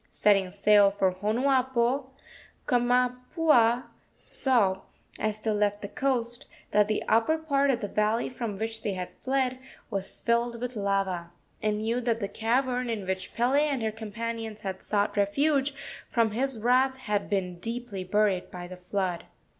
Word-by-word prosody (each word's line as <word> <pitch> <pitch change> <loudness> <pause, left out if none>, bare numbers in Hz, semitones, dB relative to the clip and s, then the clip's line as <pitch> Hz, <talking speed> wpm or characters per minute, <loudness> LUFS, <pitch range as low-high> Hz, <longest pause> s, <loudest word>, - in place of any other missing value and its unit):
Setting 195 -3 +3
sail 200 +1 +5
for 195 -1 +1
Honuapo, 255 +5 +1 0.6
Kamapuaa 250 +1 +3 0.3
saw, 205 -8 +1 0.4
as 215 0 -1
they 220 - 0
left 205 0 0
the - - -3
coast, 240 0 -1 0.2
that 210 0 +4
the 215 - -1
upper 230 +8 +3
part 280 -3 +1
of 245 -3 +1
the 205 - -2
valley 215 +3 +1
from 230 -5 -4
which 225 +1 -4
they 205 - -2
had 180 -1 -5
fled 260 -1 0 0.3
was 195 -1 -3
filled 235 0 0
with 250 +1 -4
lava, 195 -4 -1 0.3
and 210 0 0
knew 230 +3 0
that 230 -2 0
the 200 - -2
cavern 250 +3 0
in 215 -4 -3
which 190 0 -4
Pele 255 +5 +3
and 280 -6 0
her 220 - 0
companions 225 0 -5
had 190 -2 -5
sought 205 0 0
refuge 275 +7 +2 0.3
from 230 -2 +2
his 260 +3 -1
wrath 255 +4 +3
had 210 -6 -2
been 180 -3 -1
deeply 230 -2 -5
buried 195 -1 +1
by 175 -1 -7
the 185 0 -9
flood. 180 -1 -2
225 Hz, 155 wpm, -28 LUFS, 200-250 Hz, 0.6 s, sail